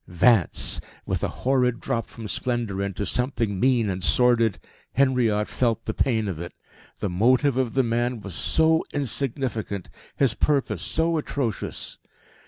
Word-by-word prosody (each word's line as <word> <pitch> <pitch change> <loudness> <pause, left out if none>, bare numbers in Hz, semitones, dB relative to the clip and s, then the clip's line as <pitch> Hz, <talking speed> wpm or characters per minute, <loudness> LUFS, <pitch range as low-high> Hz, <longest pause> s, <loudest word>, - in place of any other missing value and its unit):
Vance! 90 +2 +3 0.2
With - - -2
a - - +2 0.2
horrid 125 -2 +2
drop 115 -1 -2
from 110 -2 -9
splendour 115 -4 -2
into 100 0 -2
something 115 -3 -1
mean 125 -2 +3
and 95 -2 -3
sordid, 115 -1 +3 0.4
Henriot 120 -5 +2
felt 115 -2 0
the - - -2
pain 110 -5 +1
of 90 -5 -4
it. 85 - -7 0.5
The 100 - 0
motive 125 +8 +3
of 130 -2 -1
the 135 - +4
man 120 +1 0
was 100 -3 -8
so 160 - +2
insignificant, 125 - -2 0.2
his 135 -5 +2
purpose 140 +2 0
so 165 0 +1
atrocious. 135 -7 -3
120 Hz, 145 wpm, -25 LUFS, 105-130 Hz, 0.5 s, the